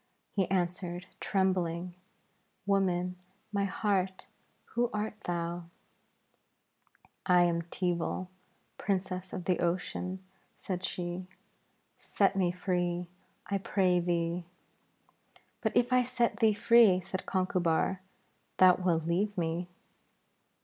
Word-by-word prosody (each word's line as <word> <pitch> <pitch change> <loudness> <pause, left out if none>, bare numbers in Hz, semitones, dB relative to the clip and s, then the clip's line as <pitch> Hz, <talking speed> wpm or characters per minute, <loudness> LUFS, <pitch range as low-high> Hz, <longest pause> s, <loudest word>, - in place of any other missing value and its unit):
He 190 -3 +1
answered, 180 -1 -1
trembling, 180 -3 0 0.7
'Woman, 180 -2 +1 0.4
my 200 -1 +1
heart, 190 -2 -1 0.5
who 240 0 +2
art 210 0 -2
thou?' 170 0 -2 1.6
'I 180 -1 +6
am 170 -1 +2
Teeval, 175 +1 -2 0.5
Princess 185 -2 -2
of 180 - -5
the 180 - +1
Ocean,' 185 +2 -2 0.3
said 185 -1 -4
she. 180 0 -3 0.7
'Set 195 -1 +1
me 185 -3 +2
free, 175 -1 -1 0.4
I 200 +1 -1
pray 185 -2 +2
thee.' 170 0 -1 1.1
'But - - 0
if 245 +1 +3
I 250 0 +5
set 245 -1 0
thee 220 -3 +4
free,' 210 -4 +6
said 185 +1 -5
Conchubar, 185 -1 +1 0.6
'thou 185 -1 +7
wilt 175 -3 +1
leave 195 +5 0
me.' 170 +1 -1
185 Hz, 105 wpm, -31 LUFS, 175-195 Hz, 1.6 s, thou